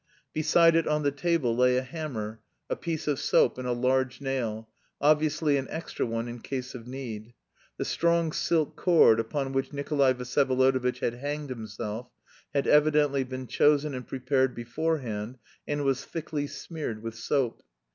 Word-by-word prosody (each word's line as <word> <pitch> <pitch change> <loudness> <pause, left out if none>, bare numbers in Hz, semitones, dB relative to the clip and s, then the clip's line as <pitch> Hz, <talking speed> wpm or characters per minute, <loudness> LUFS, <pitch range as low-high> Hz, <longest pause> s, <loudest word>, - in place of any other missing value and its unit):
Beside 165 +2 +4
it 165 - +2
on 150 0 +1
the 145 - +2
table 145 -5 0
lay 125 +1 +4
a 130 - 0
hammer, 125 -7 -5 0.3
a - - +2
piece 165 -3 -4
of 145 -3 +1
soap, - - +3
and 125 - -4
a - - 0
large 130 +1 +1
nail 120 -5 -3 0.3
obviously 150 0 +3
an 135 -1 -3
extra 160 -5 -3
one 115 +1 -2
in 120 0 -6
case 130 +1 -5
of 120 -2 -9
need. 120 -3 -7 0.4
The - - -2
strong 170 -1 +1
silk 160 -1 0
cord 160 -11 +5
upon 135 +4 -2
which 135 0 -1
Nikolay 140 -2 +2
Vsyevolodovitch 130 0 +1
had 115 - 0
hanged 145 +2 -4
himself 110 0 -5 0.4
had 140 -1 0
evidently 150 -2 +4
been 130 0 -6
chosen 145 +2 +3
and 125 -1 -6
prepared 130 0 0
beforehand 120 -3 -2 0.3
and 145 0 -1
was 135 -1 +1
thickly 150 -3 -4
smeared 140 -6 -6
with 115 0 -4
soap. 120 +2 -1
135 Hz, 160 wpm, -28 LUFS, 125-150 Hz, 0.4 s, cord